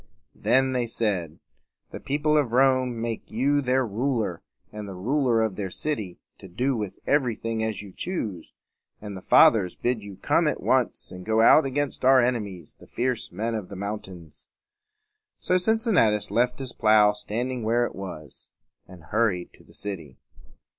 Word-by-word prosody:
Then 130 0 +2
they 125 -2 -1
said, 95 -9 -2 0.5
"The - - -7
people 150 +2 0
of 140 -6 +1
Rome 130 -2 +3
make 115 -1 -4
you 140 +6 +1
their 130 0 +1
ruler 110 -5 -2 0.3
and 105 -1 -7
the 95 - -7
ruler 120 +3 +1
of 110 -4 -2
their 100 -2 -3
city, 105 -5 -4 0.2
to - - -11
do 125 +9 -1
with 105 -4 -4
everything 115 -5 0
as 110 -2 -3
you 100 -2 -12
choose; 105 - -4 0.5
and 105 -2 -8
the 95 - -8
Fathers 95 -2 +5
bid 120 -2 -1
you 100 -1 -9
come - - +2
at - - -1
once - - 0
and 90 0 -9
go 110 +3 +2
out 135 +5 +6
against 140 0 -3
our 130 0 +6
enemies, 105 - -2
the - - -16
fierce 125 -1 -2
men 110 +6 -3
of 105 -4 -4
the 100 - -8
mountains." 95 -5 -7 0.9
So 180 - +1
Cincinnatus 185 - +2
left 125 +3 +1
his 130 -2 -4
plow 105 -1 +5
standing 120 +4 -4
where 115 +2 +2
it - - -6
was, 85 -7 -9 0.4
and 90 -3 -14
hurried 100 0 -1
to - - -19
the - - -14
city. 85 -10 -6
110 Hz, 165 wpm, -25 LUFS, 100-130 Hz, 0.9 s, out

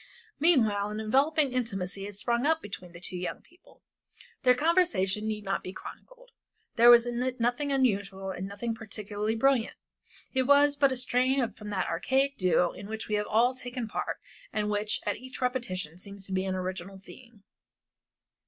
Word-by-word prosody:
Meanwhile 220 -11 +3
an 210 +1 -4
enveloping 275 +6 +2
intimacy 195 -6 -2
had 205 0 -7
sprung 235 +4 0
up 320 0 +3
between 190 - -8
the 170 - -11
two 180 +1 -3
young 180 0 -4
people. 350 +1 -24 0.6
Their 250 -1 +5
conversation 290 - +2
need 215 -1 -3
not 195 0 -1
be 185 - -7
chronicled. - - -12 0.4
There 235 +1 +7
was 240 0 +8
in 240 0 -2
it 255 0 -2
nothing 245 +5 0
unusual 200 -7 0
and 185 +1 -5
nothing 205 +4 -4
particularly 215 -1 -4
brilliant; 255 0 +2 0.6
it 260 -1 +1
was 285 0 +5
but 280 -1 +3
a 260 - -1
strain 250 0 +1
from 210 -1 -9
that 190 -3 -1
archaic 270 +1 0
duo 180 -1 +2
in 200 - -10
which 220 +1 -5
we - - -2
have 210 0 0
all 240 +4 +3
taken 250 -2 -6
part - - -3 0.3
and 210 -1 -1
which 210 +1 0
at - - -1
each 255 0 -10
repetition 185 -10 -2
seems 200 0 -6
an 190 0 -1
original 185 +1 -5
theme. 220 +2 -15
225 Hz, 170 wpm, -29 LUFS, 195-260 Hz, 0.6 s, was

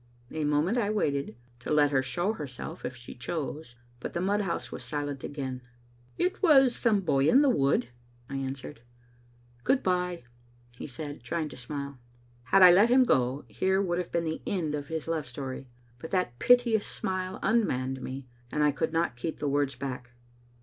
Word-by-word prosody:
A 155 -1 -2
moment 150 +11 +2
I 205 -3 0
waited, 140 - -1 0.2
to 125 - -8
let 145 -1 +4
her 135 -2 +3
show 175 +11 -1
herself 145 - -7
if 130 - -4
she 120 -1 -10
chose. 145 -1 -5 0.2
But - - -6
the - - -1
mudhouse 195 0 -1
was - - -7
silent 145 -2 -4
again. 130 -3 -4 0.3
" 120 0 -31
It 365 - -2
was 270 -9 +6
some 215 -4 +2
boy 140 -5 +2
in 275 +3 +6
the 275 - +5
wood," 140 - +2 0.4
I 140 - -4
answered. 135 0 -5 0.8
•* - - -31
Good 265 0 +2
bye," 180 -4 0 0.5
he - - -7
said, 145 +2 -7
trying 165 -2 -2
to - - -10
smile. 140 +1 -6 0.5
Had 195 +6 +6
I 180 - +11
let 200 +6 +6
him 255 +1 +6
go, 130 - +1
here 190 0 +1
would 180 -3 0
have 180 - -4
been 170 -1 0
the 160 0 -3
end 165 -6 -1
of 145 -1 -3
his 160 0 -4
love 160 -4 -1
story, 130 +1 -6 0.3
but 160 - -7
that 155 -11 -1
piteous 245 -4 +4
smile 185 0 -3
unmanned 135 - +1
me, 130 +1 -6 0.3
and 150 - +1
I 150 - +4
could 150 +3 -1
not 165 -6 +1
keep 155 +7 -4
the 150 - -2
words 140 -1 +1
back. 125 -2 -6
150 Hz, 190 wpm, -29 LUFS, 135-185 Hz, 0.8 s, I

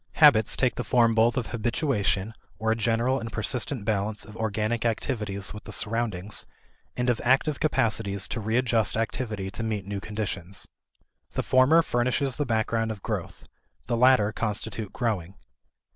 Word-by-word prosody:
Habits 125 -9 +6
take 130 -2 +2
the - - -2
form 115 -2 +3
both 115 +3 +3
of 125 - 0
habituation, 115 - 0 0.2
or 110 0 0
a - - +2
general 115 +4 +1
and 115 0 -6
persistent 120 +1 0
balance 105 0 -1
of 105 - -12
organic 110 +1 -1
activities 105 -4 -2
with 105 - -10
the - - -8
surroundings, 110 -3 0 0.5
and 125 0 0
of 120 -2 +1
active 135 +4 +2
capacities 110 -9 +1
to 115 - -3
readjust 115 -1 +1
activity 110 -4 -3
to 100 - -5
meet 110 -4 -2
new 100 0 -4
conditions. 100 -3 -5 0.7
The - - -1
former 135 +6 +5
furnishes 125 0 0
the 145 -2 -1
background 115 0 0
of 105 -3 -6
growth; - - -4 0.4
the - - -1
latter 115 -3 +4
constitute 110 -1 -3
growing. 100 -7 -2
110 Hz, 155 wpm, -26 LUFS, 105-125 Hz, 0.7 s, Habits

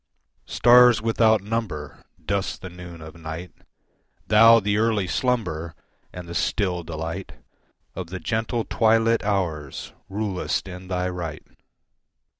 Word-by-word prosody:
Stars 120 0 +6
without 110 -2 +3
number, 100 -9 -4 0.3
Dust 100 0 -2
the 90 - -7
noon 90 -2 -10
of 80 0 -10
night, 80 +2 -7 0.7
Thou 115 +2 +7
the 105 0 0
early 110 -3 +1
slumber 90 -8 -1 0.4
And 90 -1 -9
the 85 - -7
still 90 -1 0
delight 80 +3 -6 0.6
Of 95 -3 -6
the 95 +2 -6
gentle 110 +2 -2
twilit 115 0 +3
hours 85 -9 -3 0.2
Rulest 100 -2 -2
in 90 0 -9
thy 90 0 -1
right. 85 -4 -5
95 Hz, 120 wpm, -24 LUFS, 85-110 Hz, 0.7 s, Thou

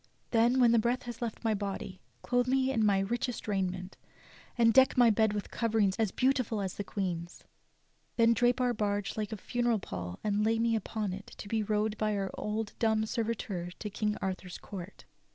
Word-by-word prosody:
Then 235 +1 +4
w'hen 250 -3 +5
the 235 - +5
breath 240 +3 0
has 240 -1 -7
left 235 -1 -4
my 225 -1 +2
body, 200 -2 -4 0.2
clothe 245 0 +1
me 265 0 +2
in 225 -4 +1
my 205 -2 +4
richest 240 +4 -2
raiment, 185 -2 -2 0.6
and 230 -1 +5
deck 265 +2 +5
my 240 -2 +7
bed 220 0 +3
with 205 -1 -4
coverings 220 -4 +1
as 220 -3 +1
beautiful 255 -4 +1
as 190 -2 -2
the 205 - -4
Queen's; 175 -4 -4 0.7
then 230 -1 +5
drape 245 +3 +2
our 250 -1 +2
barge 205 -2 -1
like 215 0 -3
a 220 - -4
funeral 240 +3 0
pall 90 - -6
and 210 0 +1
lay 225 +1 +2
me 230 0 +2
upon 215 -2 -2
it 200 +2 -8
to - - -8
be 220 +1 0
rowed 215 0 0
by 215 -1 +1
our 195 -1 -2
old 210 0 -3
dumb 220 -2 +2
servitor 215 -6 -3
to 210 - -5
King 210 +1 -1
Arthur's 185 -1 -4
court. 190 -1 -9
215 Hz, 195 wpm, -31 LUFS, 200-235 Hz, 0.7 s, my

